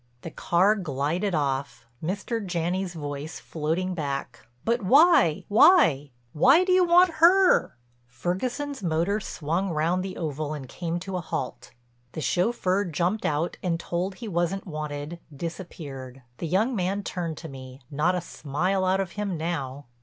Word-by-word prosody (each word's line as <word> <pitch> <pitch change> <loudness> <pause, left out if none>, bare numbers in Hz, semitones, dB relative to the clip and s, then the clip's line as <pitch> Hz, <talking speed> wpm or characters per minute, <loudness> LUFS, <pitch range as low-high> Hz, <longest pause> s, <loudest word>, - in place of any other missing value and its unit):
The 165 - -6
car 185 +7 +3
glided 175 +1 -1
off, 140 -4 -2 0.2
Mr. 205 +6 -2
Janney's 180 0 -2
voice 145 0 -5
floating 165 +4 -2
back: 140 -8 -4 0.2
"But 235 +1 +1
why, 270 - +5
why—why 160 - +4
do 370 - 0
you 365 0 +5
want 355 +1 +5
her?" 365 - +5 0.3
Ferguson's 240 - -3
motor 175 +4 0
swung 175 0 -2
round 170 +3 +1
the 190 -1 -6
oval 155 -1 -3
and 135 -3 -8
came 170 +4 -3
to 185 0 -4
a - - -3
halt. 130 -7 -5 0.4
The - - -5
chauffeur 185 - +1
jumped 180 +6 -1
out, 155 +3 -1
and, 170 -2 -1
told 180 +3 -3
he 230 - -8
wasn't 175 +1 -1
wanted, 155 -1 -5 0.2
disappeared. 135 -6 -7 0.2
The 170 - -3
young 215 +9 +1
man 195 +1 -1
turned 170 -5 -4
to 165 - -8
me, 130 -2 -10
not 155 +6 +1
a 180 - -1
smile 175 +5 -1
out 190 +1 +2
of 185 -3 -4
him 205 -4 -3
now. 145 -4 -4
175 Hz, 150 wpm, -26 LUFS, 150-195 Hz, 0.4 s, why